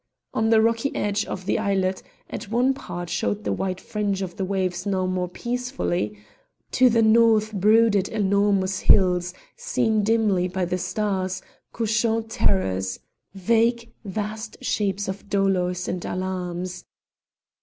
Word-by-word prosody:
On 220 0 +1
the 220 -1 +5
rocky 230 +4 +1
edge 205 +1 0
of 185 - -6
the - - +1
islet 190 -3 0 0.3
at - - -7
one 245 +4 +2
part 175 -9 -6
showed 190 +4 -2
the - - -1
white 185 -1 -2
fringe 200 -2 -2
of 175 -2 -6
the 195 - -3
waves 185 -2 -1
now 190 -2 0
more 185 -1 -1
peaceful; 245 +6 -3 0.8
to 255 0 +5
the 230 -1 +3
north 220 -1 +4
brooded 210 0 +4
enormous 200 -2 +1
hills, 180 -2 +4 0.2
seen 475 - 0
dimly 210 -4 +2
by 185 0 -2
the 180 +1 -2
stars, 190 -1 -2 0.3
couchant 225 0 0
terrors, 95 - 0 0.4
vague, 230 +4 +1
vast 215 +2 -5
shapes 200 -1 -1
of 190 +1 -6
dolours 180 -2 +1
and 180 -1 -3
alarms. 180 -1 -4
200 Hz, 135 wpm, -24 LUFS, 185-225 Hz, 0.8 s, the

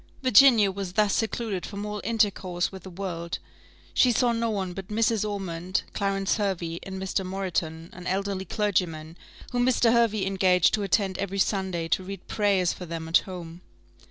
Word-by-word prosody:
Virginia 235 -4 +6
was 190 -2 -5
thus 210 0 +3
secluded 220 -4 -1
from 205 0 -5
all 210 -1 -4
intercourse 200 -5 0
with 190 -1 -9
the 190 - -10
world: 170 -2 -4 0.6
she 250 - +5
saw 240 +1 +2
no 230 0 0
one 190 -4 -2
but 190 +1 -7
Mrs. 220 0 +1
Ormond, 185 -3 -3
Clarence 195 0 0
Hervey, 175 -5 -2
and 190 0 -6
Mr. 190 0 -1
Moreton, 180 -4 -3
an 180 0 -8
elderly 195 0 -1
clergyman, 170 -6 -1 0.4
whom 245 -1 +1
Mr. 245 -2 +4
Hervey 220 -4 +2
engaged 185 -2 +3
to 215 - +1
attend 195 -1 0
every 195 0 -3
Sunday 190 -4 0
to 185 - +1
read 195 0 -8
prayers 195 -4 +2
for 180 - -8
them 165 0 -5
at 165 - +5
home. 175 -2 -8
195 Hz, 170 wpm, -26 LUFS, 180-210 Hz, 0.6 s, Virginia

